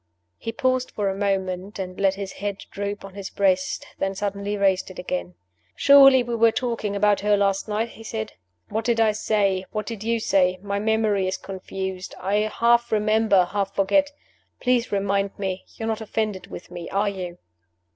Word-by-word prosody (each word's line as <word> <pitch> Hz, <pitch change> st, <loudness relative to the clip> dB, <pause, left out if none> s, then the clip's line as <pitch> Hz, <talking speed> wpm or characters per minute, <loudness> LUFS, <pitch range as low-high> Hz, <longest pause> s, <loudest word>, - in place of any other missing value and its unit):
He 225 Hz, -, -4 dB
paused 255 Hz, +2 st, 0 dB
for 205 Hz, -2 st, -1 dB
a -, -, -4 dB
moment; 195 Hz, -1 st, -2 dB
he 190 Hz, -, -2 dB
let 190 Hz, +1 st, 0 dB
his 195 Hz, -1 st, -5 dB
head 200 Hz, 0 st, -4 dB
droop 200 Hz, 0 st, -4 dB
on 195 Hz, -, -11 dB
his 200 Hz, -1 st, -6 dB
breast, 185 Hz, -2 st, +1 dB
then 195 Hz, 0 st, -1 dB
suddenly 200 Hz, +1 st, -2 dB
raised 195 Hz, -2 st, +2 dB
it 185 Hz, -, -11 dB
again. 90 Hz, -, -4 dB, 0.4 s
"Surely 275 Hz, -2 st, +7 dB
we 240 Hz, 0 st, -4 dB
were 230 Hz, 0 st, +4 dB
talking 230 Hz, -4 st, -2 dB
about 205 Hz, 0 st, +3 dB
her 205 Hz, 0 st, +3 dB
last 195 Hz, 0 st, +1 dB
night?" 220 Hz, +2 st, -1 dB
he 225 Hz, -, -12 dB
said. 220 Hz, -1 st, -5 dB, 0.4 s
"What 220 Hz, +2 st, -2 dB
did 230 Hz, 0 st, +1 dB
I 220 Hz, -1 st, +5 dB
say? 200 Hz, -3 st, +1 dB
what 215 Hz, -1 st, -3 dB
did 225 Hz, -3 st, -6 dB
you 230 Hz, +1 st, +1 dB
say? 185 Hz, -3 st, +2 dB
My 200 Hz, 0 st, -2 dB
memory 215 Hz, -2 st, +1 dB
is 185 Hz, -, -1 dB
confused; 190 Hz, -1 st, -6 dB
I 195 Hz, +3 st, 0 dB
half 235 Hz, +1 st, +3 dB
remember, 215 Hz, -3 st, +3 dB
half 195 Hz, +1 st, -2 dB
forget. 285 Hz, +9 st, +3 dB, 0.5 s
Please 250 Hz, -1 st, +1 dB
remind 200 Hz, 0 st, 0 dB
me. 190 Hz, -2 st, -3 dB
You're 225 Hz, -, -4 dB
not 225 Hz, 0 st, -2 dB
offended 215 Hz, -3 st, -2 dB
with 175 Hz, -, -10 dB
me 175 Hz, -1 st, -7 dB
are 200 Hz, +2 st, +1 dB
you?" 180 Hz, -3 st, -6 dB
200 Hz, 185 wpm, -24 LUFS, 195-220 Hz, 0.5 s, Surely